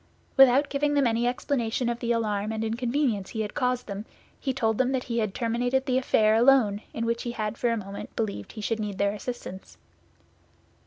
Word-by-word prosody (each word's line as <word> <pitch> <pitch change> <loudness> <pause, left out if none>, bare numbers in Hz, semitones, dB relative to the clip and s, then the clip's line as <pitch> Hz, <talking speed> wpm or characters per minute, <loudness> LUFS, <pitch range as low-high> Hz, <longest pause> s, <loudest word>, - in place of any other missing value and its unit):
Without 270 +1 +6
giving 290 +1 0
them 280 -2 +3
any 235 0 +2
explanation 245 -1 -1
of 240 0 -1
the 235 -1 -1
alarm 215 -2 0
and 220 0 -2
inconvenience 235 -2 -1
he 220 - -3
had 210 - -4
caused 250 -3 0
them, 200 0 -5 0.4
he 270 - -1
told 225 -4 0
them 260 +1 +2
that 255 -1 0
he 235 -1 -2
had 215 -3 -1
terminated 245 +3 0
the 260 -2 +2
affair 215 -4 +3
alone 225 -3 +4
in 230 - -3
which 230 0 -1
he 240 - -4
had 215 -1 -3
for 240 - 0
a 230 - +1
moment 200 -1 -7
believed 200 - -3
he 215 - -7
should 225 +1 -1
need 205 -2 -3
their 200 0 +1
assistance. 210 -3 -7
230 Hz, 205 wpm, -27 LUFS, 215-255 Hz, 0.4 s, Without